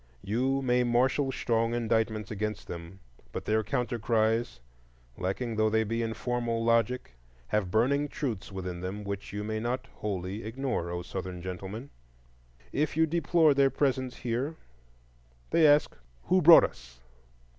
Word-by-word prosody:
You 130 +6 0
may 125 -1 +3
marshal 130 +3 +2
strong 115 -2 0
indictments 110 -2 0
against 105 0 -3
them, 85 +3 -8 0.3
but - - -5
their 110 +1 +1
counter 120 +1 -2
cries, 110 - +1 0.6
lacking 105 - -3
though 110 0 +3
they 110 +1 +2
be 115 +2 -2
in 115 -1 -2
formal 120 -2 -1
logic, 115 - +1 0.4
have 105 -4 0
burning 135 +8 +2
truths 115 -10 -4
within 90 -2 -5
them 95 +3 -5
which 100 0 -5
you 105 0 -4
may 110 +1 -2
not 120 +3 -2
wholly 100 0 -4
ignore, 115 -5 -2
O 90 0 -4
Southern 90 0 -5
Gentlemen! 95 +8 -6 0.8
If 150 +1 -1
you 160 - +5
deplore 160 -1 +3
their 135 0 +4
presence 130 -3 0
here, 125 +6 -2 1.0
they 165 -2 +6
ask, 145 0 +4 0.3
Who 185 0 +3
brought 165 +1 +9
us? - - -6
115 Hz, 145 wpm, -29 LUFS, 100-130 Hz, 1.0 s, brought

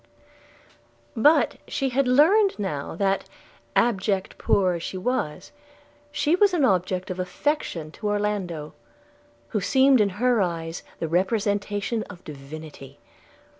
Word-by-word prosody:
But 295 +8 +4
she 275 -2 -1
had 260 +1 +1
learned 360 +11 +4
now 160 -10 -4
that, 195 +2 0 0.5
abject 200 -4 +1
and - - -20
poor 185 -2 +2
as 170 - -4
she 185 - -5
was, 195 -7 -2 0.6
she 300 +2 +2
was 390 -1 +3
an 300 -6 +3
object 185 -3 0
of 185 - -5
affection 185 - -2
to 210 - -5
Orlando, 205 -7 -2 0.8
who 210 - -1
seemed 265 +3 +4
in 205 - +3
her 245 -1 +3
eyes 165 -2 -3 0.2
the 165 - -3
representation 205 +4 0
of 185 -3 -12
divinity. 145 -1 -10
200 Hz, 130 wpm, -25 LUFS, 175-250 Hz, 0.8 s, But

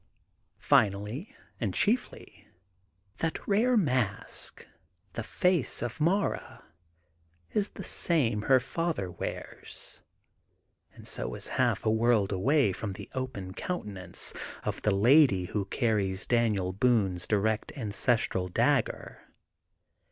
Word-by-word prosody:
Finally, 105 - +1 0.2
and - - -2
chiefly, 235 +5 0 0.7
that 165 -1 -3
rare 230 +5 +3
mask, 130 - -1 0.5
the - - -3
face 180 -10 +1
of 120 +5 -5
Mara 190 +6 0 0.9
is 210 -1 0
the 195 - -9
same 130 -16 +1
her 130 +4 +4
father 140 - -2
wears, 90 - -6 0.9
and - - -11
so - - -3
is - - -2
half - - +1
a 110 - +3
world 110 -3 +2
away 115 +3 +2
from 100 +1 -4
the - - -10
open 125 -8 -4
counte 180 - -4
nance 90 -3 -3 0.3
of - - -3
the - - +1
lady 105 - +5
who 100 +2 -2
carries 100 -4 0
Daniel 105 -6 +1
Boone 100 -4 +2
's 90 - -5
direct 110 +1 0
ancestral 110 -4 0
dagger. 90 - 0
115 Hz, 115 wpm, -29 LUFS, 100-145 Hz, 0.9 s, lady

